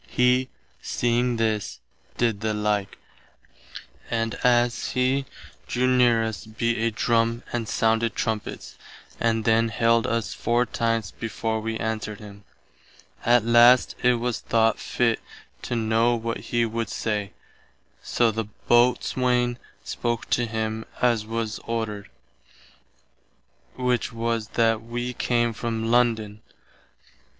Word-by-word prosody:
He, 125 +1 +2 0.3
seeing 120 0 0
this, 110 -2 -1 0.4
did 115 -4 0
the 110 -1 -1
like, 105 -2 -1 1.1
and 115 -1 -1
as 120 -1 +2
[he] 130 +1 +1 0.4
drew 125 +1 0
near 125 -3 +4
us 110 -1 -4
beat 115 +2 -1
a 115 +1 +2
drum 115 +1 +1
and 120 -2 -2
sounded 115 0 +1
trumpets, 110 -3 -4 0.4
and 115 -2 +1
then 115 0 +3
hailed 115 0 +2
us 115 -2 -1
four 120 +1 +1
times 115 -4 -1
before 115 0 -3
we 110 0 -3
answered 110 -1 -3
him. 100 -2 -12 0.8
At 120 -2 +5
last 120 +2 +6
it 125 0 +4
was 120 0 -2
thought 115 -1 +2
fitt 120 -2 0 0.4
to 120 - -3
know 115 +1 +2
what 115 0 -3
he 120 -1 +2
would 115 -1 -3
say, 105 -3 -2 0.7
soe 120 -2 +1
the 110 0 -3 0.2
Boatswaine 125 0 +2 0.2
spoke 120 -1 -3
to 120 -1 +2
him 110 0 -3 0.2
as 115 -3 +1
was 115 -2 -3
ordered, 110 -3 -3 1.7
which 125 -1 0
was 115 -1 -2
that 115 -1 +3
wee 120 +2 -4
came 120 -1 0
from 115 +1 -3
London. 110 -3 +1
115 Hz, 125 wpm, -24 LUFS, 110-120 Hz, 1.7 s, last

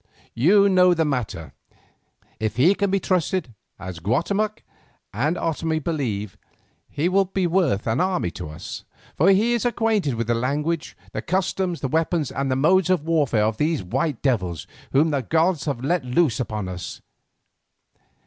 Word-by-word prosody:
You 195 - +5
know 180 -2 +5
the 160 -1 +1
matter. 105 - -3 0.9
If 110 0 -2
he 150 - +5
can 200 0 -1
be 195 +1 +1
trusted, 180 -7 -1 0.2
as 90 -2 -7
Guatemoc 200 - -1 0.5
and 150 - 0
Otomie 160 0 -1
believe, 125 - -3 0.5
he 150 +4 -1
will 195 +2 +3
be 190 0 -1
worth 170 - +1
an 115 +7 +1
army 180 - 0
to 90 -4 -7
us, 75 - -8 0.3
for 170 +6 +4
he 215 +5 +4
is 235 - 0
acquainted 225 - +1
with 115 0 -2
the 120 - +1
language, 150 +7 -2
the - - -4
customs, 185 -1 -1
the 135 - -1
weapons, 160 0 0
and 135 0 -2
the 130 - +1
modes 180 +7 +3
of 180 -5 +1
warfare 145 -10 +2
of 110 0 -1
these 155 - 0
white 140 - -2
devils 90 - 0 0.3
whom 155 +4 +3
the 140 -2 0
gods 160 +3 +1
have 135 -4 -3
let 170 +2 +1
loose 125 +1 +1
upon 105 -5 -3
us. 90 -1 -6
155 Hz, 165 wpm, -23 LUFS, 120-180 Hz, 0.9 s, You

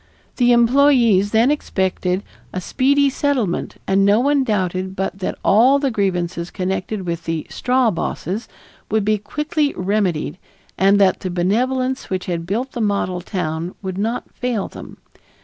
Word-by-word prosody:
The 245 -1 +4
employees 240 -4 +4
then 230 +5 +3
expected 190 -8 -1 0.3
a 185 - -3
speedy 280 +8 +2
settlement 265 -9 -1
and 195 +1 +2
no 205 +2 +4
one 280 +2 +2
doubted 190 -4 -1
but 195 0 -3
that 185 - -3
all 245 +7 +5
the 275 -2 0
grievances 180 -4 -1
connected 190 +1 -3
with 170 -1 -4
the 165 -1 -2
"straw 250 -2 +2
bosses" 190 +4 -3 0.4
would 215 -1 +1
be 215 0 +2
quickly 300 - -1
remedied 185 -4 -1 0.4
and 195 +1 +4
that 195 -2 +4
the 185 - -4
benevolence 255 +9 0
which 185 -1 -2
had 170 -2 -3
built 240 +8 -2
the 240 - -4
model 200 -4 0
town 170 -2 -3
would 190 0 -4
not 225 +4 -1
fail 245 -5 -2
them. - - -11
200 Hz, 150 wpm, -20 LUFS, 185-250 Hz, 0.4 s, all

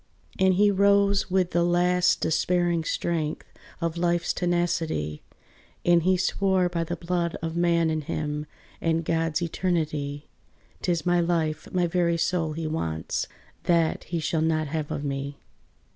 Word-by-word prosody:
And 190 -1 +4
he 205 +2 +4
rose 200 0 +3
with 185 -1 +1
the 175 - +2
last 180 +1 +3
despairing 175 0 +1
strength 160 -1 -2 0.3
Of 170 -1 -2
life's 175 0 +1
tenacity, 170 - -1 0.6
And 175 -1 +5
he 185 +2 +3
swore 190 -1 +1
by 170 -1 -1
the 175 - -3
blood 170 0 -2
of 165 0 -3
man 170 -1 +2
in 155 0 -1
him, 150 0 -3 0.3
And 165 0 0
God's 165 0 0
eternity, 155 -5 -2 0.5
"'Tis 170 -3 0
my 175 0 +3
life, 160 -3 -1
my 180 -1 +2
very 170 0 +1
soul 165 -1 0
he 165 +1 -4
wants; 80 - -2 0.4
That 165 -2 +2
he 170 - -3
shall 160 +1 0
not 160 -1 +1
have 155 -1 -3
of 145 - -3
me." 140 0 -3
170 Hz, 145 wpm, -26 LUFS, 155-175 Hz, 0.6 s, And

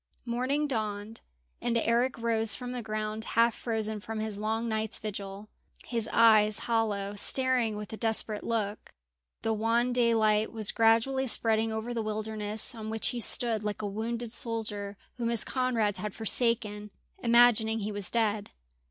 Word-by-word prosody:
Morning 255 +5 -1
dawned, 215 -3 -4 0.4
and 235 -1 0
Eric 235 +3 +1
rose 225 -1 +3
from 250 -1 -6
the 250 -1 -4
ground, 215 0 -4
half 230 0 +2
frozen 220 -2 -3
from 220 +2 -6
his 215 -1 -2
long 220 +3 -2
night's 220 -1 -2
vigil, 200 -1 -7 0.4
his 230 -2 -2
eyes 215 -2 +5
hollow, 210 -4 -1
staring 250 +1 +1
with 210 0 -7
a - - -5
desperate 220 -2 +2
look. 215 -2 -3 0.5
The 225 - +1
wan 230 +3 +1
daylight 220 -3 +2
was 220 -2 0
gradually 230 +4 +2
spreading 225 -1 +4
over 220 +2 -4
the 230 - -2
wilderness, 215 +1 -2
on 220 -2 -7
which 220 0 -1
he 245 - -4
stood 230 -2 +1
like 210 0 -4
a - - -1
wounded 230 +3 -4
soldier 215 -4 -3 0.2
whom 235 -1 -1
his 235 -2 +2
comrades 235 -6 0
had 210 -2 -5
forsaken, 220 -2 0 0.3
imagining 235 -2 +4
he 210 +1 -3
was 205 -2 -4
dead. 215 -3 0
220 Hz, 155 wpm, -29 LUFS, 215-235 Hz, 0.5 s, eyes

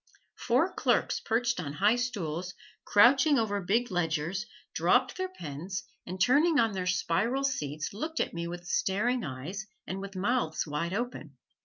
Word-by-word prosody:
Four - - +3
clerks - - +1
perched 235 -1 0
on 145 -5 -4
high 205 +9 +3
stools, 180 -8 -3 0.3
crouching 270 +7 +6
over 205 -3 0
big 220 +6 +1
ledgers, 175 +3 -1 0.3
dropped - - +3
their 375 0 -2
pens 175 - -6 0.2
and 185 +2 -5
turning 295 - +4
on 225 -1 +3
their 185 -2 -3
spiral 195 +8 +1
seats 155 - -2
looked 315 +10 -4
at - - -1
me 170 0 -3
with 175 0 -7
staring 215 +7 0
eyes, 155 +11 -5 0.2
and 190 +1 -4
with 200 0 -8
mouths 195 -4 0
wide 165 +4 -2
open. 210 - -4
195 Hz, 155 wpm, -29 LUFS, 170-245 Hz, 0.3 s, crouching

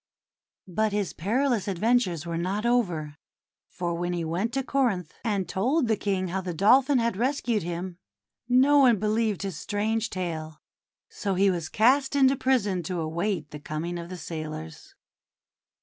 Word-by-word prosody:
But 210 +4 0
his 205 -3 -1
perilous 235 - 0
adventures 195 -4 +1
were 170 -1 -3
not 195 +5 -2
over, 175 -12 0 0.5
for 175 -1 -3
when 175 +1 -2
he 170 -2 -2
went 180 +8 -1
to 270 0 0
Corinth 230 - 0
and 200 -6 -1
told 250 - +1
the 220 - +2
King 190 -3 -1
how 190 +2 -2
the 180 -2 -5
Dolphin 255 - +5
had 235 -3 +1
rescued 240 -1 0
him, 175 +1 -5 0.5
no 270 +4 +5
one 250 -5 +6
believed 215 0 0
his 190 -5 -4
strange 215 +3 -1
tale. 160 -4 -5 0.5
So 195 -2 -3
he 195 +1 +4
was 170 -3 -3
cast 265 +6 +3
into 270 -1 +5
prison 220 -9 +1
to 175 +1 -4
await 165 0 -2
the 150 - -7
coming 165 +4 -4
of 170 0 -8
the 185 - -6
sailors. 155 - -7
195 Hz, 160 wpm, -26 LUFS, 170-235 Hz, 0.5 s, one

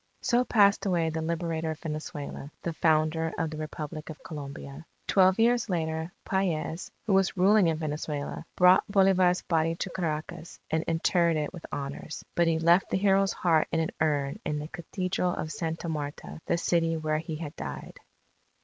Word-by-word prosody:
_ - - -8
So 245 0 +3
passed 205 -3 +4
away 170 -3 +1
the 160 0 -3
Liberator 165 0 -2
of 160 0 -4
Venezuela, 150 -2 -6
the 170 - -2
founder 160 0 +2
of 165 -1 -1
the 155 - -6
Republic 155 0 -6
of 155 - -9
Colombia. 140 -1 -8 0.2
Twelve 190 -1 +4
years 235 0 +3
later 160 -1 -2
Paez, 175 -3 -1 0.2
who 210 - +1
was 190 0 +2
ruling 195 +1 +5
in 160 -1 +1
Venezuela, 150 -2 -4
brought 180 0 +6
Bolivar's 185 -2 +4
body 165 -1 +1
to 180 +1 -4
Caracas 165 0 -4
and 160 - +2
interred 170 0 +2
it 150 +2 -2
with 175 - -9
honours. 140 +2 -5
But 170 -1 +2
he 165 -1 +2
left 170 +3 +4
the - - +1
hero's 195 0 +3
heart 165 -3 +2
in 165 - +1
an 160 - -1
urn 145 -3 0
in 150 -1 -2
the 150 +1 -5
Cathedral 180 +1 -2
of 155 - -4
Santa 165 0 -3
Marta, 150 0 -5
the 170 - +2
city 165 -1 +1
where 155 -1 0
he 160 0 -5
had 155 -2 -6
died. 70 -1 -7
165 Hz, 175 wpm, -28 LUFS, 155-180 Hz, 0.2 s, brought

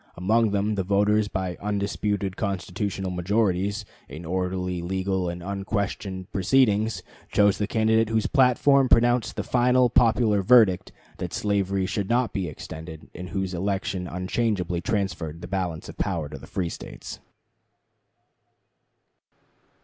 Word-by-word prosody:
Among 110 +5 +2
them 100 +1 0
the 100 -2 -1
voters 105 +2 +2
by 95 -3 -3
undisputed 100 -1 -1
constitutional 95 -1 -3
majorities, 100 +2 0 0.2
in 80 +4 -8
orderly, 90 0 -2
legal, 95 0 -1
and 85 0 -6
unquestioned 100 -1 -3
proceedings, 110 +1 +2 0.3
chose 100 -1 +3
the 105 - 0
candidate 110 0 +2
whose 110 -1 +1
platform 135 0 +4
pronounced 120 -1 +3
the - - -2
final 125 0 +3
popular 115 -4 +3
verdict 100 -3 +5 0.3
that - - -4
slavery 100 -2 0
should 100 +1 -2
not 120 0 +1
be 95 -3 -2
extended, 80 +1 -9
and 90 0 -7
whose 95 -2 -3
election 95 0 -2
unchangeably 90 -1 -1
transferred 90 -6 -2
the - - -7
balance 90 -4 -3
of - - -11
power 85 -7 -1
to - - -8
the - - -12
free 90 -3 -2
States. - - -8
100 Hz, 130 wpm, -25 LUFS, 90-110 Hz, 0.3 s, verdict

